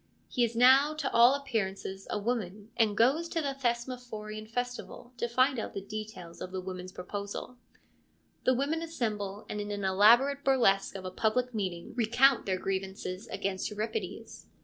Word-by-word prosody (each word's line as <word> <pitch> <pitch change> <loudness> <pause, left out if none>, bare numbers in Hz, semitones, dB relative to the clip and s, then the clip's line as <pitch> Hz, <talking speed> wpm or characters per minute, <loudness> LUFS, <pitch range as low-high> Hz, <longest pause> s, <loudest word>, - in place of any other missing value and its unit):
He 245 - +1
is 235 0 0
now 265 +5 +6
to 305 -3 -2
all 240 +3 +7
appearances 195 -8 -3
a - - -1
woman 210 -1 -3
and 220 -3 +2
goes 285 +9 +3
to 335 - -1
the 280 -3 -1
Thesmophorian 235 -4 -4
Festival 245 +1 -5
to 235 - -1
find 255 +2 +2
out - - -5
the 195 - -3
details 210 -5 -7
of 185 - -5
the 190 - -3
women's 185 0 -6
proposal. 200 +6 -6 0.9
The 255 - +4
women 290 +5 0
assemble, 215 -10 -3
and 210 - -3
in 205 - -5
an 205 -1 -3
elaborate 235 +9 +5
burlesque 215 -9 +3
of 190 -1 -6
a 185 - -4
public 245 +6 0
meeting 185 -5 -3
recount 245 +3 +3
their 190 -1 +1
grievances 190 0 -4
against 190 -1 -2
Euripides. 215 - -5
220 Hz, 165 wpm, -30 LUFS, 195-250 Hz, 0.9 s, all